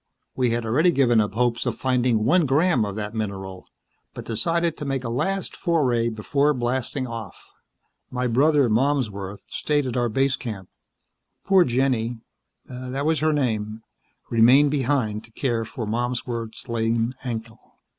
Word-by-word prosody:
We 125 -2 +1
had 115 0 -1
already 145 +11 +3
given 125 -8 +4
up 105 -1 -2
hopes 120 0 +1
of - - -2
finding 125 -4 +1
one 165 +4 +4
gram 140 -3 +3
of 100 -1 -5
that 105 0 -4
mineral, 95 -4 -5 0.5
but - - -7
decided 165 +9 0
to - - -6
make 135 -2 -2
a 115 - -3
last 175 +11 -2
foray 130 -10 +1
before 140 +7 +1
blasting 130 +2 -2
off. 115 -5 -8 0.6
My 125 0 -2
brother, 140 +3 +3
Malmsworth, 110 -6 -1
stayed 145 -2 -1
at 125 - -3
our 120 -1 +1
base 135 +4 +1
camp. 100 -6 -7 0.8
Poor 190 -2 +6
Jenny 120 -3 0 0.5
that 130 +2 -5
was 160 0 +2
her 155 0 +2
name 110 -6 -1 0.5
remained 125 +6 +6
behind 130 -6 0
to 115 - -18
care 115 -3 -1
for 110 +1 -6
Malmsworth's 120 +1 -3
lame 115 +1 0
ankle." 115 -2 -5
120 Hz, 150 wpm, -24 LUFS, 110-140 Hz, 0.8 s, Poor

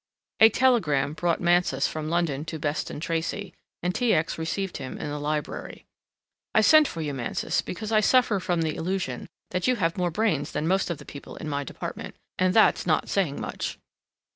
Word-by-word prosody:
A 220 - +9
telegram 155 - +2
brought 170 +1 0
Mansus 175 -6 +2
from 155 -1 -4
London 165 -4 0
to 160 0 -5
Beston 145 -1 -3
Tracey, 170 +5 -3 0.3
and 180 0 0
T. 240 +1 +2
X. 160 +1 -1
received 185 +4 -2
him 130 -2 -6
in 145 - -4
the 145 - -3
library. 150 0 -4 0.7
"I 220 - +6
sent 310 +6 +7
for 165 - -5
you, 150 -2 -3
Mansus, 125 -3 -1
because 215 +4 -6
I 215 - +5
suffer 230 -1 +3
from 175 -2 0
the 155 -1 -1
illusion 180 -8 -3 0.2
that 180 +4 -1
you 255 - +3
have 170 -4 -1
more 180 -1 +1
brains 170 -6 0
than 150 +2 -1
most 190 +1 +1
of 170 - -2
the 145 - -13
people 140 - -10
in 155 - -7
my 145 -1 -2
department, - - -7 0.2
and 185 0 +3
that's 220 - +4
not - - +1
saying 175 -8 0
much." - - -4
170 Hz, 190 wpm, -26 LUFS, 150-195 Hz, 0.7 s, A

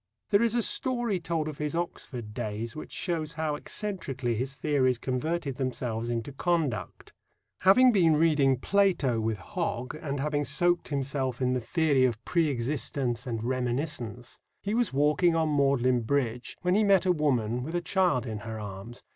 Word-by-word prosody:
There 200 +1 +5
is 235 0 +2
a 240 - +2
story 240 -7 0
told 165 -2 -2
of 155 -2 -6
his 150 +1 -2
Oxford 125 -10 -4
days 110 +2 -4
which 155 - -8
shows 165 -3 -2
how 155 -1 -1
eccentrically 150 - -3
his 130 +5 -3
theories 130 -4 +1
converted 135 +3 -2
themselves 120 -3 -2
into 120 +3 -2
conduct. 145 - -2 0.5
Having 250 +7 +6
been 170 -7 +4
reading 150 -4 +3
Plato 175 - +2
with 110 -1 -1
Hogg, 120 +5 -3
and 145 -2 -4
having 145 +1 0
soaked 175 +5 +1
himself 135 -3 -2
in 125 -1 +1
the 125 - 0
theory 145 0 +2
of 120 -3 -2
pre 170 -3 +2
existence 130 -1 -2
and 115 -2 -3
reminiscence, 125 -2 -3 0.2
he 205 - -1
was 240 -1 +1
walking 150 +5 +3
on 160 -2 +1
Magdalen 130 -3 +3
Bridge 120 -1 -1
when 180 0 +2
he 215 +3 +4
met 195 -2 +4
a 185 - +4
woman 125 -8 +1
with 160 +7 -5
a - - +2
child 175 - +1
in 110 -3 -4
her 110 +1 -6
arms. 105 +3 -8
140 Hz, 170 wpm, -28 LUFS, 120-165 Hz, 0.5 s, Having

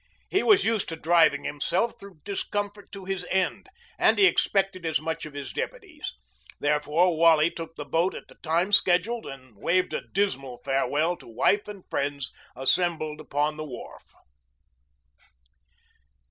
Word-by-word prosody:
He 395 - +3
was 415 -4 +5
used 225 -3 0
to 165 - -3
driving 160 -3 +3
himself 175 +10 0
through 195 -6 -13
discomfort 205 0 -4
to 195 -1 -9
his 195 -1 -3
end, 190 -1 0 0.3
and - - +5
he 400 - +6
expected 195 - +2
as 160 -5 +1
much 160 0 -4
of 145 - -13
his 140 -2 -6
deputies. - - -5 0.4
Wherefore 150 +4 +2
Wally 165 0 +5
took 165 -1 -8
the 150 - -6
boat 165 +6 +1
at - - -9
the - - -16
time 170 +4 +1
scheduled 205 +4 +3
and 130 -4 -11
waved 180 - +1
a - - -1
dismal 135 -11 -2
farewell 150 +5 +1
to - - -15
wife 195 - +1
and 205 -3 -9
friends 140 -1 -2 0.2
assembled 155 +2 0
upon 150 +1 -1
the 155 - -4
wharf. 130 -5 -11
165 Hz, 150 wpm, -26 LUFS, 150-195 Hz, 0.4 s, he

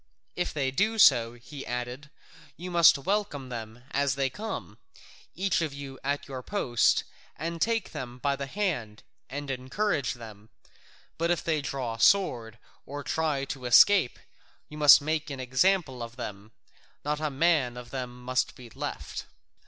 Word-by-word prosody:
"If 175 - -1
they 135 -3 -1
do 215 +10 +1
so," 120 - +6
he 135 +4 -9
added, 125 +3 -5 0.5
"you 180 +2 -6
must 170 -4 +7
welcome 145 -5 -2
them 115 0 -7
as 140 -2 +1
they 135 -1 0
come, 220 +10 -6 0.6
each 190 -2 +1
of 155 -4 -2
you 135 -2 -8
at 140 +1 -2
your 130 -2 -6
post, 125 - +2 0.3
and 165 +1 -4
take 225 -3 0
them 125 -1 -6
by 140 +2 0
the 140 0 -5
hand 140 - -3 0.3
and 140 +1 -4
encourage 140 +4 -1
them, 110 -2 -12 0.7
but 170 +1 +1
if 175 -2 +1
they 155 -3 0
draw 130 -4 -3
sword 115 - +3 0.3
or 145 +1 -6
try 150 -4 -1
to 135 -2 -6
escape, 170 - +6 0.5
you 150 - -9
must 145 -2 +9
make 155 +1 -1
an 140 -2 -6
example 130 +1 +1
of 115 0 -7
them: 105 -3 -7 0.5
not 150 0 -1
a 155 -1 -1
man 140 -4 +2
of 120 -1 -9
them 125 -2 -6
must 130 +1 0
be 120 -2 -12
left." - - -6
140 Hz, 160 wpm, -28 LUFS, 125-160 Hz, 0.7 s, must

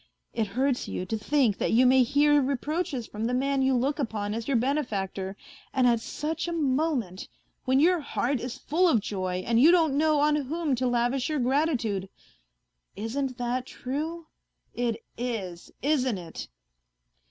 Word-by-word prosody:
It 225 -2 0
hurts 255 +5 0
you 180 - -4
to 220 - -2
think 225 -1 +1
that - - 0
you 245 +3 +5
may 260 +1 +6
hear 290 +3 +4
reproaches 280 0 -2
from 215 +1 -5
the 245 +2 0
man 275 +1 +1
you 265 0 +3
look 275 +5 0
upon 210 -5 -2
as 230 0 -4
your 275 -3 +2
benefactor 205 -8 -2 0.4
and 260 -2 +3
at 235 -2 +4
such 320 +8 -4
a - - -2
moment! 275 - -1 0.4
when 260 +1 +3
your 350 +4 +4
heart 275 -2 -1
is 250 +2 -5
full 345 +8 +1
of 245 -10 +4
joy 185 -3 -3
and 230 0 +3
you 305 - +8
don't 325 -5 +4
know 305 0 +3
on 295 +1 +3
whom 300 +1 -1
to 255 0 0
lavish 245 +2 0
your 305 - 0
gratitude.... 250 - 0 0.9
Isn't 250 +4 -3
that 245 +1 -2
true? 315 +6 -4 0.5
It 235 -2 -2
is, 200 -8 -4
isn't 260 -6 +1
it 170 -2 -8
255 Hz, 165 wpm, -27 LUFS, 230-290 Hz, 0.9 s, you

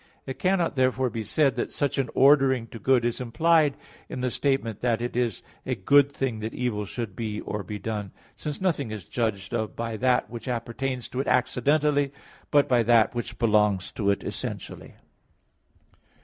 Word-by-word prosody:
It 130 0 -6
cannot 185 -2 +1
therefore 130 -1 +1
be 110 0 -4
said 135 +5 +2
that - - -2
such 140 -2 -1
an 130 -3 0
ordering 135 -3 +5
to 115 - -9
good 125 +2 +3
is 120 +1 -1
implied 155 +4 +3 0.3
in 130 - -5
the 125 -1 0
statement 125 -5 -1
that 120 -2 +1
it 120 0 -4
is 120 -5 -1 0.2
a - - -2
good 140 +8 +4
thing 130 -5 -2
that 110 +1 -5
evil 115 -5 -2
should 115 -3 -5
be 110 -2 -3
or 105 - -4
be 105 +2 -6
done, 105 -1 -4 0.2
since 150 -2 -5
nothing 165 -10 0
is 105 -4 -6
judged 105 -5 -2
of 110 -1 -2
by 115 -1 -3
that 125 +2 +2
which 120 0 -8
appertains 125 +1 -3
to 130 - -4
it 135 - -1
accidentally, 145 +3 +2 0.4
but 145 -1 +4
by 125 -2 +3
that 115 -1 +4
which 120 0 -5
belongs 105 -4 +2
to 100 -2 -1
it 100 - +1
essentially. - - -6
120 Hz, 180 wpm, -26 LUFS, 110-135 Hz, 0.4 s, ordering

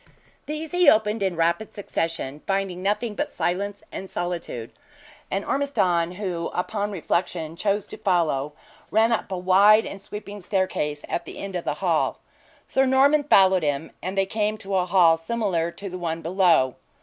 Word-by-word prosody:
These 305 +1 -4
he 355 -4 +6
opened 215 -1 +2
in 190 -3 0
rapid 170 +6 0
succession, 165 -7 -3
finding 195 -2 -1
nothing 210 +3 -1
but - - -2
silence 200 +3 -2
and 190 - -7
solitude; 170 -10 -4 0.6
and 195 +1 -2
Ormiston 180 -12 +1
who, 180 -4 -3
upon 205 +3 -1
reflection, 170 -3 -2
chose 205 +3 0
to - - -10
follow 155 -6 0 0.4
ran 225 +2 +3
up 225 - -1
a 185 - -2
wide 200 +4 +5
and 195 - -7
sweeping 205 0 -8
staircase 175 -6 -1
at 170 - -3
the - - -9
end 195 -1 -6
of 175 - -3
the - - -1
hall. - - +1 0.5
Sir 265 0 +2
Norman 280 +3 +4
followed 190 -8 +5
him, 145 0 -2
and 185 +2 -4
they 195 - +3
came 215 +2 -1
to 200 -2 -7
a 180 -1 +1
hall 170 -3 +5
similar 175 -2 -1
to 200 - -8
the 185 -1 -6
one 165 -1 -3
below. 170 -7 +3
190 Hz, 170 wpm, -24 LUFS, 170-210 Hz, 0.6 s, he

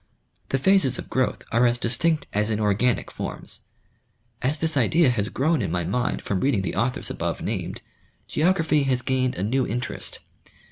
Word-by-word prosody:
The 135 - +1
phases 140 -3 +3
of - - -8
growth 130 -1 0
are 120 +2 +4
as 120 0 +1
distinct 140 +7 0
as 105 +1 +1
in 110 -1 0
organic 105 +2 +1
forms. - - -6 0.8
As 135 +5 0
this 160 0 -1
idea 140 +3 +4
has 105 -3 -1
grown 150 +2 +1
in 100 - -1
my 90 +1 -1
mind 125 +8 -1
from 100 - -1
reading 115 -6 +1
the 90 - -2
authors 125 +2 -1
above - - -3
named, - - -3 0.4
geography 160 -2 +2
has 130 -2 +1
gained 130 0 0
a 90 - -3
new 125 +4 +1
interest. 120 +3 -4
125 Hz, 175 wpm, -24 LUFS, 110-145 Hz, 0.8 s, are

